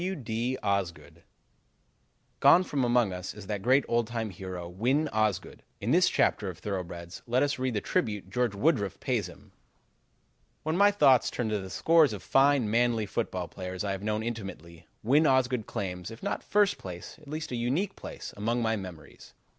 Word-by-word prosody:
W. 190 +2 -2
D. 120 -1 -2
Osgood 100 -4 -2 1.2
Gone 180 - +7
from 140 -7 -1
among 120 -5 +2
us 90 +1 -6
is 105 -2 -9
that 105 -1 -3
great 130 +5 +3
old 120 -1 +1
time 115 -2 -3
hero, 90 -1 -6
Win 125 - +1
Osgood. 110 -4 -1 0.2
In - - -1
this - - +5
chapter 100 - +1
of 90 - -8
thoroughbreds, 90 -2 -6
let 125 +3 +2
us 145 -2 -1
read 130 -2 -1
the 105 - 0
tribute 105 -3 -2
George 120 -1 0
Woodruff 105 - +1
pays - - -1
him: - - -16 1.1
"When 155 +1 -1
my 200 +3 +6
thoughts 140 -11 +4
turn 120 -3 -2
to 105 -1 0
the 95 -1 -7
scores 160 - +4
of 100 -4 -7
fine, 135 +1 +4
manly 115 -1 +2
football 95 -5 -3
players 90 +1 -6
I 100 - -1
have 95 -1 -4
known 105 +1 -1
intimately, 95 -7 -7 0.2
Win 145 +7 +4
Osgood 130 -4 +2
claims, 90 -1 -4
if 115 +7 -11
not 200 - -2
first 205 -1 +2
place, 90 +5 -8
at 150 - -17
least 155 +1 -5
a - - -2
unique 140 +12 -1
place, - - -8
among 115 +4 -1
my 110 0 +1
memories. 90 -7 -10
110 Hz, 185 wpm, -29 LUFS, 95-130 Hz, 1.2 s, Gone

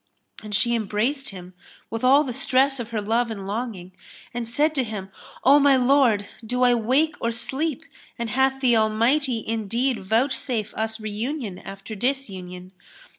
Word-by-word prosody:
[FN#302] - - -15
And 210 -1 -3
she 235 +3 +2
embraced 235 +6 -1
him 185 -2 -10 0.4
with 225 +1 -4
all 275 +4 +6
the 255 -4 -4
stress 270 +1 +2
of 235 -1 -5
her 220 -2 -2
love 230 +3 +1
and 200 -3 -6
longing 200 -3 -4 0.4
and 240 -1 -3
said 295 +6 +1
to 270 -4 +1
him, 205 -4 -6 0.3
"O 280 +2 +7
my 280 -2 +5
lord 250 -6 +3 0.2
do 250 +3 -1
I 245 -1 +5
wake 260 +7 +2
or 230 - 0
sleep 265 +5 -2 0.3
and 235 -2 -3
hath 265 +2 +1
the 245 -3 +4
Almighty 230 +3 +1
indeed 230 +2 -1
vouchsafe] 225 +1 0
us 220 +1 -3
reunion 215 0 -4
after 195 +2 -9
disunion? 190 -7 -4
235 Hz, 165 wpm, -24 LUFS, 215-265 Hz, 0.4 s, O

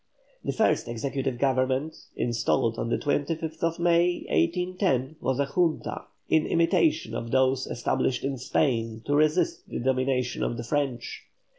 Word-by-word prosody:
The - - -1
first 220 - +1
Executive 130 +2 -2
Government, 130 +3 +1 0.2
installed 115 -1 0
on 115 - -2
the - - +1
25th 160 +3 -1
May, 175 +1 +2
1810, 160 - 0
was 130 -1 0
a 140 - +3
Junta, 165 +3 -1 0.2
in 160 -1 +2
imitation 160 -6 +2
of 115 0 -4
those 130 +1 +2
established 120 +1 -1
in 135 -1 -2
Spain 115 -4 0
to 145 - 0
resist 155 +3 +1
the - - -4
domination 130 0 0
of 120 - -1
the 120 - -4
French. 135 -1 -2
135 Hz, 140 wpm, -27 LUFS, 125-160 Hz, 0.2 s, a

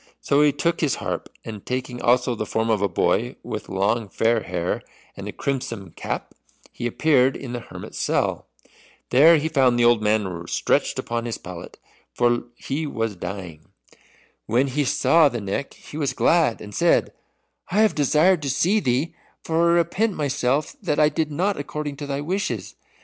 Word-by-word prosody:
So 140 +1 +2
he 150 -1 +5
took 170 +4 -1
his 150 -5 +2
harp, - - -4 0.2
and 110 -3 -7
taking 125 -1 -4
also 125 +1 +3
the 110 -2 -4
form 110 0 0
of 105 -3 +1
a 100 - +3
boy 85 - 0
with - - -6
long 100 +3 0
fair 115 +2 +1
hair 90 -2 -2 0.3
and - - -7
a - - -4
crimson 125 -9 -4
cap, - - -5 0.4
he 120 - -3
appeared 135 0 +3
in 125 -3 -7
the 120 - -3
hermit's - - -9
cell. - - 0 0.6
There 155 +6 +7
he 155 +1 -1
found 130 -6 +3
the 120 - +4
old 120 -2 +5
man 100 -6 0
stretched - - +1
upon 120 0 -3
his 115 - -3
pallet, 90 -1 -9 0.4
for 120 0 +3 0.4
lie 150 +4 -1
was 115 -6 -2
dying. 90 -4 -7 0.8
When 125 +5 +2
he 145 +2 0
saw 160 +3 +4
the 120 - -4
Neck 100 +7 -4
he 150 - -11
was 145 -3 -1
glad, 160 -9 +2
and 105 0 -9
said, - - +2 0.6
"I 200 +5 +2
have 220 -2 +4
desired 155 +5 +3
to 140 - -2
see 185 +11 +2
thee, 130 0 0 0.3
for 165 +1 +2
I - - +4
repent 185 +5 +1
myself 140 0 0
that 150 - 0
I 150 -1 +5
did 155 -1 -2
not 190 +7 0
according 145 0 -4
to 145 0 -6
thy 140 0 -2
wishes. 190 +7 -3
130 Hz, 180 wpm, -23 LUFS, 115-150 Hz, 0.8 s, There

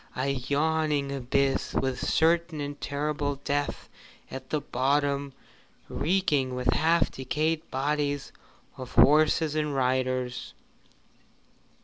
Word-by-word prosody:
A 130 +2 -1
yawning 145 +2 0
abyss, 135 +1 0
with 130 -2 0
certain 165 0 +2
and 145 0 -5
terrible 145 0 -2
death 145 0 -2 0.4
at 130 0 -8
the 155 - 0
bottom, 140 +1 0 0.6
reeking 150 -7 0
with 125 0 +1
half 165 +2 +2
decayed 155 +4 -2
bodies 145 +1 -1 0.5
of 130 -1 -8
horses 155 +1 +5
and 150 -2 -1
riders! 130 -1 -1
145 Hz, 100 wpm, -27 LUFS, 130-155 Hz, 0.6 s, horses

